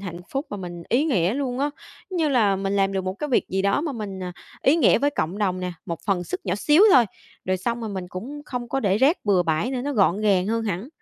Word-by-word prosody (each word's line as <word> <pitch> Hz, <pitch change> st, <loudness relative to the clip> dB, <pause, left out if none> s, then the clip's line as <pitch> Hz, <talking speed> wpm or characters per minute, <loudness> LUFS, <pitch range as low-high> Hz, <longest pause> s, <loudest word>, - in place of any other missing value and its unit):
hạnh 175 Hz, -3 st, -7 dB
phúc 275 Hz, +3 st, -3 dB
và 205 Hz, -, -4 dB
mình 175 Hz, -3 st, -7 dB
ý 255 Hz, +6 st, +2 dB
nghĩa 200 Hz, -, +1 dB
luôn 260 Hz, -3 st, -2 dB
á, 290 Hz, +1 st, 0 dB, 0.4 s
giống 370 Hz, -, -3 dB
như 320 Hz, -2 st, +2 dB
là 220 Hz, -8 st, +3 dB
mình 195 Hz, +1 st, -1 dB
làm 195 Hz, 0 st, +2 dB
được 190 Hz, -1 st, -2 dB
một 185 Hz, 0 st, -2 dB
cái 295 Hz, +9 st, -4 dB
việc 255 Hz, -, +1 dB
gì 190 Hz, +1 st, -1 dB
đó 200 Hz, +7 st, +2 dB
mà 305 Hz, -2 st, -3 dB
mình, 200 Hz, -6 st, -6 dB
à, 180 Hz, -, -5 dB, 0.3 s
ý 280 Hz, +4 st, +4 dB
nghĩa 330 Hz, -, +5 dB
với 285 Hz, +1 st, +2 dB
cộng 180 Hz, -, -2 dB
đồng 185 Hz, -3 st, 0 dB
nè, 180 Hz, -1 st, -3 dB
một 170 Hz, -2 st, -4 dB
phần 185 Hz, -4 st, 0 dB
sức 370 Hz, -, -4 dB
nhỏ 180 Hz, -3 st, 0 dB
xíu 295 Hz, -, +4 dB
thôi, 245 Hz, -, +7 dB, 0.4 s
rồi 185 Hz, 0 st, 0 dB
xong 235 Hz, +6 st, -2 dB
rồi 225 Hz, -, -4 dB
mà -, -, -6 dB
mình 180 Hz, -2 st, -5 dB
cũng 265 Hz, +12 st, -7 dB
không 245 Hz, -4 st, -5 dB
có 270 Hz, -, -1 dB
để 200 Hz, -2 st, +2 dB
rác 285 Hz, +7 st, +4 dB
bừa 195 Hz, -4 st, +3 dB
bãi 165 Hz, +9 st, 0 dB
nữa, 255 Hz, -, -2 dB
nó 285 Hz, +2 st, -2 dB
gọn 200 Hz, -4 st, +2 dB
gàng 195 Hz, -3 st, +2 dB
hơn 230 Hz, +1 st, 0 dB
hẳn. 200 Hz, +3 st, -3 dB
205 Hz, 285 wpm, -24 LUFS, 185-265 Hz, 0.4 s, thôi